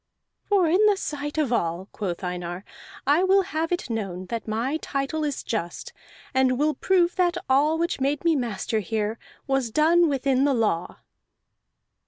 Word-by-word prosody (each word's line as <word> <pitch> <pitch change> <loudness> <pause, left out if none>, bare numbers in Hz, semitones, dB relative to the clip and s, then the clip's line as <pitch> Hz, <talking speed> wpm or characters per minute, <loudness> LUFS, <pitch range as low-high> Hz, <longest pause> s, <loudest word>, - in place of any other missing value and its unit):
"For 395 -4 +3
in 365 +6 +3
the 410 -2 +3
sight 295 -4 -4
of 285 -6 +1
all," 175 -3 -1
quoth 190 -3 -4
Einar, 180 +1 -4 0.4
"I 295 +6 +4
will 385 +1 +4
have 330 -3 -3
it 355 - -1
known 195 -6 -4
that 230 -1 -4
my 235 +7 -1
title 280 +1 -3
is 290 -2 -2
just, 175 -7 -4 0.4
and 260 -1 +3
will 300 +2 +2
prove 355 0 +2
that 355 -1 +2
all 290 +4 +3
which 335 -4 -1
made 280 +3 0
me 330 -1 +4
master 225 -4 -1
here 215 +2 -2 0.3
was 270 -3 0
done 325 +6 +4
within 270 -1 +1
the 280 -1 +3
law." 210 -7 -1
275 Hz, 165 wpm, -25 LUFS, 220-320 Hz, 0.4 s, I